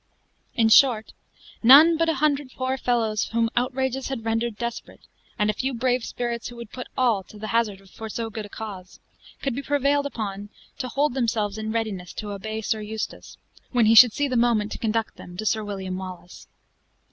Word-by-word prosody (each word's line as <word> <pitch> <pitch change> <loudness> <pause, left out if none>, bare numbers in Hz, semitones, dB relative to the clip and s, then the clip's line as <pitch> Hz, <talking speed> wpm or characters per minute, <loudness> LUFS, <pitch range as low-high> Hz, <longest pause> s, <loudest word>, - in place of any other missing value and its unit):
In 225 -2 +3
short, 225 -2 +5 0.5
none 290 +8 +8
but 330 +1 +1
about - - +3
a 305 - -5
hundred 285 -2 0
poor 260 0 -1
fellows 230 -4 0
whom 230 0 0
outrages 265 +1 -1
had 260 -5 -5
rendered 225 -1 -1
desperate, 235 0 -6 0.4
and 210 -3 +2
a 215 - +2
few 265 +3 -2
brave 250 0 0
spirits 235 -1 -3
who 240 - -9
would 235 -2 -9
put 250 - -7
all 240 -6 +2
to 215 - -14
the 215 +1 -6
hazard 210 -4 -1
for 220 +4 -9
so 225 +1 -4
good 215 -1 -6
a - - -23
cause, 195 -4 -8 0.4
could 275 - 0
be 270 - -3
prevailed 285 0 +1
on 205 -2 -4 0.3
to 255 - -2
hold 280 +3 0
themselves 220 -5 -1
in 220 0 -3
readiness 215 -6 -3
to 210 -1 -6
obey 220 +2 -5
Sir 220 0 -1
Eustace, 215 +1 -6 0.4
when 240 -3 +4
he 220 - +5
should 235 +1 +9
see 290 -1 0
the 255 - -2
moment 230 -3 +2
to - - -5
conduct 225 0 -1
them 175 0 -11
to 215 - -4
Sir 220 0 +1
William 190 -2 -5
Wallace. 185 -1 -9
230 Hz, 200 wpm, -24 LUFS, 215-255 Hz, 0.5 s, should